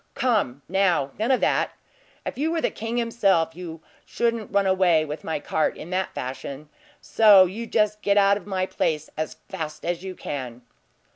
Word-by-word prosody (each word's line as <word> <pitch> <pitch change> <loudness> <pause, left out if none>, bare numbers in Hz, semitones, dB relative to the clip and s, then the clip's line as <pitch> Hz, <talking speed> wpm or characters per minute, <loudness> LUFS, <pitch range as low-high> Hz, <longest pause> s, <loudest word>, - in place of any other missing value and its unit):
"Come, 200 - 0
now; 175 -7 +1
none 225 +3 0
of 260 - +3
that! - - +1 0.5
If - - -4
you 300 +5 0
were 335 - 0
the - - 0
king 225 +2 -4
himself, 195 -9 +1
you 165 -2 -8 0.2
shouldn't 230 -2 -2
run 200 0 +2
away 185 -4 +3
with 150 0 -6
my 160 - -2
cart 155 +2 -1
in 170 - -9
that 185 0 -2
fashion; 135 +3 -6 0.3
so 205 -4 +6
you 220 +6 -5
just 210 -1 +1
get 200 0 +2
out 200 0 +5
of 200 -1 -8
my 190 -2 -1
place 155 -4 -2
as 155 0 -4
fast 160 -6 -6
as 175 +1 -2
you 190 -1 -6
can!" 125 -6 -6
185 Hz, 185 wpm, -24 LUFS, 155-210 Hz, 0.5 s, so